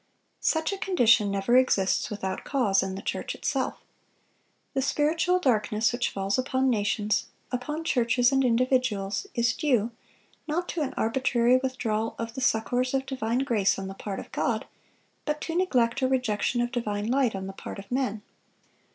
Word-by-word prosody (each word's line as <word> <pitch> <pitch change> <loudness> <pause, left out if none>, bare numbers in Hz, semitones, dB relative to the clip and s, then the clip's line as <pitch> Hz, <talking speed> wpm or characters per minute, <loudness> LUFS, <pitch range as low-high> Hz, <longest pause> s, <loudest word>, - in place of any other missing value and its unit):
" - - -45
Such 320 +4 +1
a 390 - -5
condition 235 - +4
never 200 +4 +1
exists 230 -7 +3
without 190 -3 -4
cause 215 -9 +2
in 190 0 -3
the 195 - -7
church - - -3
itself. - - -2 0.9
The 270 - +1
spiritual 320 +6 +2
darkness 220 -7 +1
which 240 0 0
falls 195 +4 -1
upon 260 0 +1
nations, 210 -1 0 0.2
upon 295 +6 -3
churches 245 -3 +2
and 270 0 +3
individuals, 245 -5 +1
is 235 -1 +2
due, 245 -7 +1 0.6
not 345 +4 -1
to 335 - -2
an 285 - -2
arbitrary 245 +1 +3
withdrawal 225 -4 -2
of 230 0 -4
the 265 - -5
succors 250 +2 +1
of 265 0 0
divine 255 -1 -1
grace 215 -7 +2
on 195 -1 -5
the - - -6
part 195 0 -5
of - - -10
God, - - -1 0.6
but 300 0 -2
to 330 - -4
neglect 265 -8 +2
or 260 - +3
rejection 245 -2 0
of 240 0 -1
divine 210 -4 -2
light 250 -2 +1
on 190 0 -4
the 195 - -6
part - - -8
of 195 +2 -11
men. 245 -5 -1
240 Hz, 170 wpm, -27 LUFS, 210-265 Hz, 0.9 s, condition